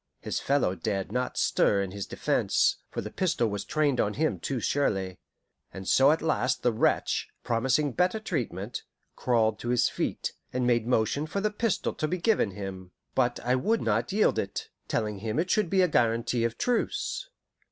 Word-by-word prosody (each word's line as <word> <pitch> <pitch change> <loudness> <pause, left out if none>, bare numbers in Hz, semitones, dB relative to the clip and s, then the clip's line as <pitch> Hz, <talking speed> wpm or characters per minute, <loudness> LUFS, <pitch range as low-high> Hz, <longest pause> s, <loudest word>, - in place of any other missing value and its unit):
His - - -3
fellow 140 -9 +1
dared 95 +2 -3
not 125 +2 -2
stir 100 -1 +3
in 95 - -5
his 100 0 -5
defence, - - +1
for - - -4
the 105 - -7
pistol 170 - +1
was 100 - -3
trained 145 -5 +1
on 105 - -1
him 155 0 0
too 135 -3 -2
surely; 95 -9 0 0.5
and 95 0 -8
so 135 +1 +5
at 160 - 0
last 130 -5 0
the 120 - +3
wretch, 110 - +1
promising 130 +5 +1
better 180 - +1
treatment, 120 - -3 0.3
crawled 110 -3 +1
to 120 - -4
his 125 -1 +3
feet, - - -3 0.2
and 125 0 -1
made 120 -2 +2
motion 125 +5 +1
for 200 - -2
the 210 +1 0
pistol 215 -1 -1
to 155 - -2
be 180 - -1
given 190 - +2
him. 95 -2 -7 0.2
But 120 0 +1
I 125 - +1
would 215 - +1
not - - 0
yield 210 +2 +3
it, - - -4 0.2
telling 105 -2 -1
him 110 +2 -3
it 175 +4 0
should 210 -5 +2
be 190 0 +4
a - - +4
guarantee 115 -3 +1
of 115 - -2
truce. - - -1
125 Hz, 185 wpm, -28 LUFS, 110-160 Hz, 0.5 s, so